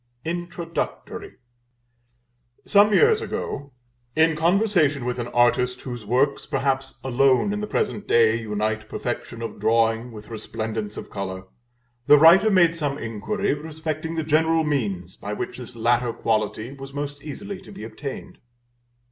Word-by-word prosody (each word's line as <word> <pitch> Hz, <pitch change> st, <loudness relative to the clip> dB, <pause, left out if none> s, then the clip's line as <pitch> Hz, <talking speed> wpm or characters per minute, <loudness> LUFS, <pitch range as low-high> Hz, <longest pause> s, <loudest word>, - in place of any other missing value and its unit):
INTRODUCTORY. 170 Hz, 0 st, -4 dB, 1.3 s
Some 205 Hz, +1 st, +5 dB
years 445 Hz, -, +5 dB
ago, 140 Hz, -, -4 dB, 0.4 s
in 160 Hz, 0 st, +4 dB
conversation 165 Hz, -, +2 dB
with 125 Hz, 0 st, -2 dB
an 120 Hz, -, -3 dB
artist 125 Hz, +1 st, +2 dB
whose 120 Hz, -3 st, -6 dB
works, 135 Hz, +5 st, +1 dB
perhaps, 135 Hz, 0 st, -1 dB
alone, 130 Hz, +8 st, +3 dB
in 210 Hz, -, -3 dB
the 210 Hz, -, -3 dB
present 205 Hz, -, -2 dB
day, 115 Hz, -1 st, +4 dB
unite 110 Hz, 0 st, -2 dB
perfection 120 Hz, -1 st, -4 dB
of 110 Hz, -3 st, -6 dB
drawing 115 Hz, +2 st, +2 dB
with 105 Hz, -1 st, -11 dB
resplendence 110 Hz, -1 st, -5 dB
of -, -, -8 dB
color, 95 Hz, -2 st, -5 dB, 0.6 s
the 145 Hz, 0 st, +9 dB
writer 170 Hz, +8 st, +7 dB
made 175 Hz, -4 st, +4 dB
some 145 Hz, -4 st, -2 dB
inquiry 130 Hz, -, -2 dB
respecting 160 Hz, +1 st, -4 dB
the 160 Hz, -, -1 dB
general 160 Hz, +1 st, +3 dB
means 100 Hz, -, -2 dB
by 105 Hz, -, -5 dB
which 105 Hz, -, -5 dB
this 125 Hz, 0 st, -9 dB
latter 120 Hz, +1 st, +2 dB
quality 110 Hz, +2 st, -1 dB
was 135 Hz, 0 st, -10 dB
most 145 Hz, 0 st, -4 dB
easily 195 Hz, +7 st, -7 dB
to -, -, -13 dB
be -, -, -9 dB
attained. 125 Hz, +5 st, -7 dB
135 Hz, 140 wpm, -24 LUFS, 115-160 Hz, 1.3 s, the